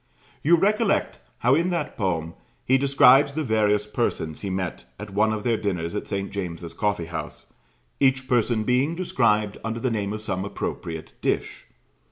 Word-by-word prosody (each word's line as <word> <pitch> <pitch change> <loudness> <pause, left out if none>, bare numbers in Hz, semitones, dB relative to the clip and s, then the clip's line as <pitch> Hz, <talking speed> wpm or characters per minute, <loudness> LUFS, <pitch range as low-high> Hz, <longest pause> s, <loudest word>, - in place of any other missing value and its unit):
You 170 +4 +5
recollect 205 +4 +1 0.2
how 125 +3 +3
in 170 +5 +2
that 175 -2 -2
poem 85 -5 -1 0.3
he 130 +1 +4
describes 140 0 +5
the 155 +1 -1
various 105 -4 +2
persons 105 -8 -2
who 100 - -3
met 95 -2 -3
at 105 0 -8
one 110 +2 +3
of 110 -1 -3
their 115 -2 +1
dinners 90 -5 -2
at 105 - -4
St. 100 0 -3
James's 85 -4 -5
Coffee 105 -5 -1
house, 85 - -7 0.5
each 130 -1 +2
person 120 -3 +2
being 130 +7 +1
described 110 - +1
under 115 +1 -3
the 130 0 -1
name 100 -3 -1
of 110 0 -5
some 95 -3 -2
appropriate 85 -4 -5
dish. - - -2
110 Hz, 170 wpm, -24 LUFS, 100-130 Hz, 0.5 s, You